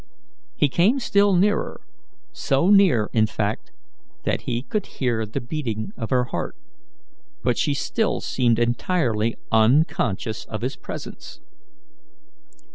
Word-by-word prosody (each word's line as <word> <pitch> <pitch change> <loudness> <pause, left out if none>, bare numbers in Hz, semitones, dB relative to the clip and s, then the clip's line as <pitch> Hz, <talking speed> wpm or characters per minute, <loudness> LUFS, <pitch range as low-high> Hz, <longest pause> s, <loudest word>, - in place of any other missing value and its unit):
He 145 - +3
came 185 - +3
still 200 -5 +3
nearer 205 +4 +1 0.5
so 140 +8 +1
near, 180 - +4
in 110 -1 +3
fact, 105 0 -3 0.5
that - - -1
he 120 +1 -1
could 210 +6 -3
hear 115 -4 0
the 115 +6 -3
beating 120 -5 -4
of 115 - -5
her 125 -1 +3
heart 125 - -4 0.9
but 125 -1 +2
she 145 +3 0
still 220 +9 0
seemed 120 -3 +1
entirely 120 -2 0 0.2
unconscious 110 - +2
of 110 -1 -6
his 135 +2 -2
presence. - - -9
125 Hz, 120 wpm, -23 LUFS, 110-170 Hz, 0.9 s, near